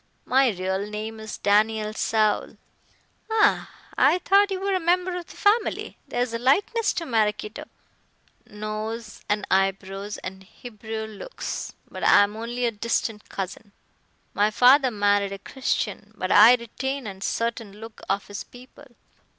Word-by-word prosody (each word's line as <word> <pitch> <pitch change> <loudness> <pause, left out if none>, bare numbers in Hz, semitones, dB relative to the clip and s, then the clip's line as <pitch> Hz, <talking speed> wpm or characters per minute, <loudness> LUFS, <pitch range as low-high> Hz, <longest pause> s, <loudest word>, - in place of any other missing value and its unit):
"My 265 0 +4
real 190 0 -2
name 215 +1 -5
is 220 0 -7
Daniel 215 +1 +2
Saul." 215 -1 0 0.7
"Ah! 440 -1 +3 0.3
I - - +4
thought 400 +2 +4
you 380 -1 -2
were 395 +1 -1
a 375 - +2
member 360 +1 +1
of 355 -1 -6
the - - -14
family. 420 +2 +1
There 245 - 0
is 245 -2 -5
a 230 - -2
likeness 410 - +2
to 335 - -3
Maraquito 215 -3 -1 0.5
" - - -38
"Nose 215 +1 -5
and 210 0 0
eyebrows 195 +1 0
and 190 +1 -7
Hebrew 220 +2 -7
looks. 220 - -6
But - - -8
I - - +7
am 205 +1 -3
only 240 +2 -3
a 235 - +1
distant 220 0 -2
cousin. 200 +2 -6 0.6
My 205 +1 +3
father 255 +5 +5
married 205 -2 +1
a - - -5
Christian, 210 -2 -3
but 185 - -2
I 225 +4 +9
retain 265 +3 -4
a 195 -2 -8
certain 230 -1 -2
look 220 +2 -11
of 200 +1 0
his 205 -1 -7
people. 255 +3 -15
220 Hz, 155 wpm, -25 LUFS, 205-255 Hz, 0.7 s, I